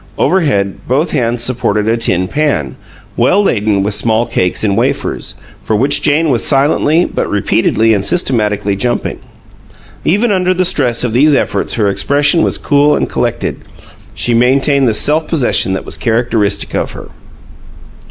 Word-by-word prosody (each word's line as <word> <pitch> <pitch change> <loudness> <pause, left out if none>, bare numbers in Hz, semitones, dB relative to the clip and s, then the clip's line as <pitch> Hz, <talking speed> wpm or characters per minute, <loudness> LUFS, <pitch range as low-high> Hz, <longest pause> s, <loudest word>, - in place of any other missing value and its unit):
Overhead, 135 - 0
both 145 +6 0
hands 120 -4 -1
supported 120 -4 -1
a 115 - +2
tin 95 -6 0
pan, 140 - -2 0.4
well 200 +2 +2
laden 105 - 0
with 105 +1 -2
small 110 +3 0
cakes 90 -5 -2
and 100 -2 +1
wafers, 130 +5 -2 0.3
for 110 - -1
which 135 +7 +2
Jane 150 +1 +1
was 120 - 0
silently 150 +4 +2
but - - -3
repeatedly 110 +2 +1
and 100 -2 -1
systematically 105 - 0
jumping. 120 +4 -2 0.8
Even 210 +6 +1
under 185 -1 +1
the 185 0 +1
stress 125 -9 +1
of 120 -3 -2
these 145 +4 +3
efforts - - -1
her 105 -3 0
expression 140 - +2
was - - +1
cool 145 +1 +2
and - - -2
collected; - - -2 0.6
she 120 - -1
maintained 135 +2 +2
the 110 - -1
self 155 +6 +1
possession 125 - +1
that 95 - -4
was - - -3
characteristic 115 -3 -1
of - - -3
her. - - -11
120 Hz, 155 wpm, -13 LUFS, 105-150 Hz, 0.8 s, these